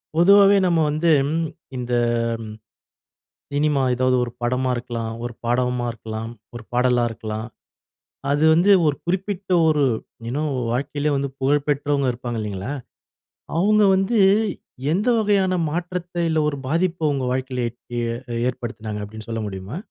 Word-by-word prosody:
பொதுவாவே 200 +3 +7
நாம்ம 170 -2 +2
வந்து 155 +3 +1 0.7
இந்த 125 0 -3 0.5
ம் 110 -1 -8 1.0
சினிமா 145 -1 +2
ஏதாவது 130 +1 +2
ஒரு 120 - -4
படமா 125 +2 0
இருக்கலாம், 115 -2 -4
ஒரு 120 0 -4
பாடவுமா 125 +1 0
இருக்கலாம், 110 0 -6 0.2
ஒரு 120 - -7
பாடலா 125 0 +3
இருக்கலாம் 110 0 -5 0.8
அது 145 +2 +2
வந்து 175 +5 +4 0.2
ஒரு 145 -1 +2
குறிப்பிட்ட 190 +1 -2 0.2
ஒரு 150 -2 +3 0.4
யு 115 - -3
நோ 150 - 0 0.3
வாழ்க்கையில 145 +3 -1
வந்து 140 0 -1
புகழ் 140 +2 +2
பெற்றவங்க 145 -2 +1
இருப்பாங்க 120 -1 -5
இல்லேங்களா! 105 +3 -4 0.9
அவுங்க 210 +4 +4
வந்து 195 +5 +1 0.7
எந்த 205 +8 +1
வகையான 200 -3 +2 0.2
மாற்றத்த, 175 +2 -4
இல்ல 160 -1 +1
ஒரு 145 - -2
பாதிப்ப 165 +2 0
உங்க 135 -2 -1
வாழ்க்கையில 130 -1 -2
எட் 120 +2 -31 0.2
ஏ - - -1 0.5
ஏற்படுத்தினாங்க 110 -4 -5
அப்பிடீன்னு 110 +2 -9
சொல்ல 115 -1 -2
முடியுமா? 95 +6 -6
135 Hz, 135 wpm, -22 LUFS, 120-170 Hz, 1.0 s, பொதுவாவே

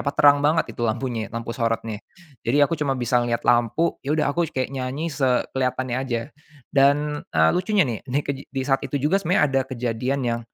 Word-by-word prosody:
apa, 140 - 0
terang 145 0 +6
banget 155 +2 +2
itu - - -9
lampunya, 115 0 -2
lampu 115 0 -5
sorotnya. 115 -2 -2 0.4
Jadi, 120 +5 0
aku 145 - -3
cuma 145 -4 -1
bisa 125 0 +2
ngelihat 120 -1 -2
lampu. 120 +8 +2
Ya 140 - -4
udah, 150 - +2
aku 170 -1 +1
kayak 130 -1 -1
nyanyi 130 +5 -3
sekelihatannya 130 -1 0
aja. 120 -3 -2 0.5
Dan, 145 +2 +3
eee, 80 0 +4
lucunya 190 +1 +2
nih, 115 -3 -3
nih 140 +3 +1
kej 140 -1 -2
di 135 -1 -2
saat 135 -1 +2
itu - - -3
juga 155 +9 +2
sebenarnya 180 +4 +2
ada 135 -1 +1
kejadian 125 +2 -2
yang 115 0 -1
130 Hz, 195 wpm, -23 LUFS, 120-145 Hz, 0.5 s, terang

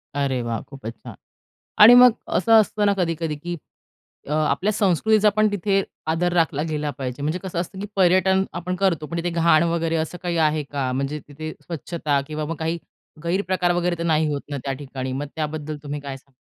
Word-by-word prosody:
अरे 135 -3 0
वाह! 115 -1 -3
खूपच 130 -5 -9
छान. - - -9 0.6
आणि 220 +4 +10
मग 250 0 +9 0.3
असं 230 - 0
असतं 210 0 -1
ना 200 - +4
कधी-कधी, 165 -3 -1
की 170 +4 -5 0.7
अ, - - -3
आपल्या 155 +6 +1
संस्कृतीचा 210 +2 +3
पण 215 0 +4
तिथे 195 0 +1 0.2
आदर 170 +2 0
राखला 160 -4 +1
गेला 150 -1 -2
पाहिजे. 130 0 -4
म्हणजे 155 +5 -1
कसं 180 -3 -3
असतं, 185 +2 -6
की 205 - -4
पर्यटन 190 +1 +4
आपण 180 +1 -3
करतो, 170 -6 +1
पण 170 - -5
तिथे 175 +1 -1
घाण 170 -1 +4
वगैरे 165 -1 0
असं 160 +2 -3
काही 175 -1 -2
आहे 150 0 0
का? 140 -2 -3
म्हणजे 140 +3 -2
तिथे 155 +2 -7
स्वच्छता 155 -3 -2
किंवा 155 0 -4
मग 165 +1 -4
काही 165 +1 -2 0.5
गैरप्रकार 180 0 +1
वगैरे 175 0 0
तर 170 - -3
नाही 160 -2 +2
होत 145 - -2
ना, 145 - -3
त्या 135 - -1
ठिकाणी, 130 -1 -5
मग 140 +3 -3
त्याबद्दल 155 -1 -3
तुम्ही 145 0 -5
काय 140 -1 -6
सांगाल? 135 0 -22
160 Hz, 195 wpm, -23 LUFS, 145-180 Hz, 0.7 s, आणि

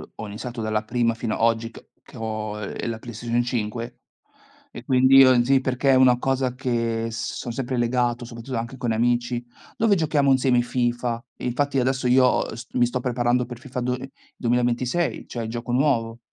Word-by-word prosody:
ho 110 - -7
iniziato 115 +3 -6
dalla 110 0 -1
prima 115 +1 0
fino 115 -1 -3
a - - -2
oggi 115 0 +2
c - - -13 0.2
che - - -14
ho, 110 -1 -4
ehm, 105 +3 -4
la 115 - -3
Play 120 +1 -9
Station 120 +2 -1
5 115 -1 -3 0.8
e 120 - -10
quindi 130 +1 +5
io 130 -2 +7
sì 135 +2 +3
perché 130 +1 +1
è - - +6
una 130 -1 +5
cosa 130 -1 0
che 115 -3 -1
son 115 +1 -4
sempre 130 +1 -3
legato 120 0 0
soprattutto 115 +2 -7
anche 115 +3 -5
con 120 -3 -1
amici, 120 +1 0 0.3
dove 220 -2 +3
giochiamo 150 -4 +2
insieme 130 -2 +3
FIFA. 120 -1 -1 0.2
Infatti 140 +3 0
adesso 130 0 0
io, 125 0 +4
uhm, - - -7
s 120 +2 -9
mi 120 -1 +4
sto 125 +1 -2
preparando 125 0 +1
per 120 -1 -8
FIFA 125 -1 -6
do 125 +1 -1
uhm, 125 +1 -4 0.3
2026, 125 +6 0
cioè 120 - -5
il - - -5
gioco 120 +1 -4
nuovo. 120 -4 +1
120 Hz, 190 wpm, -24 LUFS, 115-130 Hz, 0.8 s, io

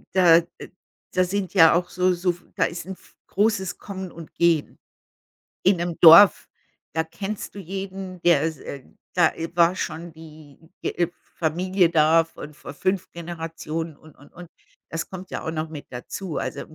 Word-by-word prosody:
Da 175 -3 +7 0.2
äh, - - -10 0.4
da 185 - +3
sind 190 +1 -3
ja 165 -5 +7
auch 175 +1 0
so 180 +1 +1
so 180 0 0 0.2
da - - +2
ist 170 - -5
'n 190 +1 -6
v - - -23
großes 195 -3 0
Kommen 190 -3 -7
und 165 -1 -12
Gehen. 170 -3 +1 0.9
In 190 +1 +4
'nem 170 -1 -3
Dorf, 170 +4 +8 0.4
da 160 - +1
kennst 195 +5 -6
du - - -9
jeden, 190 -1 -6
der 170 -5 +4 0.2
äh, 140 -2 -8 0.3
da - - +4 0.2
war 170 +1 +4
schon 170 +1 -5
die, 155 -3 -14 0.2
äh, 175 -1 0 0.3
Familie 180 +2 +1
da 165 0 +4
von 150 -2 -11
vor 145 - -10
5 185 +5 -1
Generationen 165 -2 -6
und, 155 0 -18
und, 145 - -19
und. 175 0 -11 0.4
Das 165 - -4
kommt 185 0 -9
ja - - -4
auch - - -2
noch 155 0 -3
mit 150 -2 -9
dazu. 155 +7 -6
Also, - - -4
im 155 - -11
170 Hz, 170 wpm, -24 LUFS, 160-185 Hz, 0.9 s, Dorf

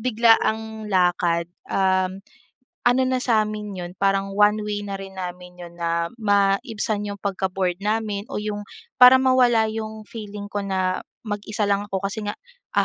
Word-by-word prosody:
biglaang 220 -2 +2
lakad, 175 -3 +2 0.2
um, 190 0 +1 0.6
ano 245 +2 +4
na 255 0 0
sa'min 215 -4 0
'yon, 175 0 -6
parang 195 +1 0
one 210 +1 +4
way 205 -1 -2
na 200 -1 -5
rin 195 0 -9
namin 180 -1 -7
'yon 170 0 -11
na 170 0 -1
maibsan 205 +1 +1
'yong 200 -1 -6
pagka-bored 190 -2 -1
namin 210 0 -2
o - - -6
'yong, 205 -1 -4 0.3
para 260 +1 +9
mawala 245 -4 +4
'yong 220 0 -5
feeling 205 -2 -8
ko 205 - -2
na 185 -1 0 0.3
mag-isa 210 0 -2
lang 200 0 0
ako. 195 -1 -3
Kasi 200 +3 -2
nga, 205 -1 -4 0.4
ah, - - +5
205 Hz, 155 wpm, -23 LUFS, 190-220 Hz, 0.6 s, para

